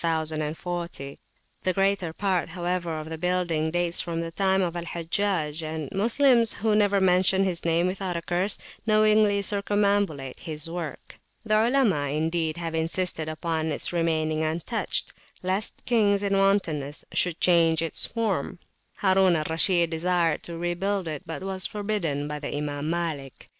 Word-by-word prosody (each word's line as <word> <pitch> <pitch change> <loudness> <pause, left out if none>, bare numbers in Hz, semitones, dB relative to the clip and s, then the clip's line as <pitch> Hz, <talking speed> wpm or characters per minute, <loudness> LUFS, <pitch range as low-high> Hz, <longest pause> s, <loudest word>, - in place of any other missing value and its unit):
The 160 -1 -3 0.6
greater 195 -3 +1
part, 185 +1 -1
however, 175 -2 -2
of 155 +1 -7
the 160 - -5
building 175 -3 0
dates 175 +1 0
from 165 -2 -3
the 165 0 -5
time 190 +1 +2
of 175 -1 -2
Al 170 -1 -4
Hajjaj; 170 -2 -1
and 155 -2 -5
Moslems, 235 +3 +3
who 215 0 +1
never 205 -1 +3
mention 190 +1 +3
his 180 -3 +1
name 170 +1 +2
without 185 -1 -2
a 170 - -5
curse, 180 +4 +1 0.3
knowingly 215 -1 +4
circumambulate 200 -9 +1
his 155 -2 -5
work. 165 -4 -7 0.3
The 215 - 0
Olema 220 - +3
indeed 160 0 -1
have 165 -1 -4
insisted 160 0 -1
upon 160 0 -2
its 160 - -2
remaining 160 -2 0
untouched, 160 +1 -2 0.3
lest 190 +4 -2
kings 205 -4 +3
in 200 -1 +1
wantonness 170 -8 +1
should 175 -2 +1
change 165 -2 +4
its 165 - -1
form: 200 -7 -2 0.4
Harun 190 -2 +4
al 155 -1 -1
Rashid 170 0 +3
desired 165 -1 +1
to 170 -1 -7
rebuild 175 +2 -1
it, 155 -3 -4
but 165 +3 -5
was 190 -1 -1
forbidden 200 -9 -2
by 150 0 -4
the 145 0 -4
Imam 145 0 -3
Malik. 160 -6 -4
175 Hz, 150 wpm, -26 LUFS, 160-195 Hz, 0.6 s, knowingly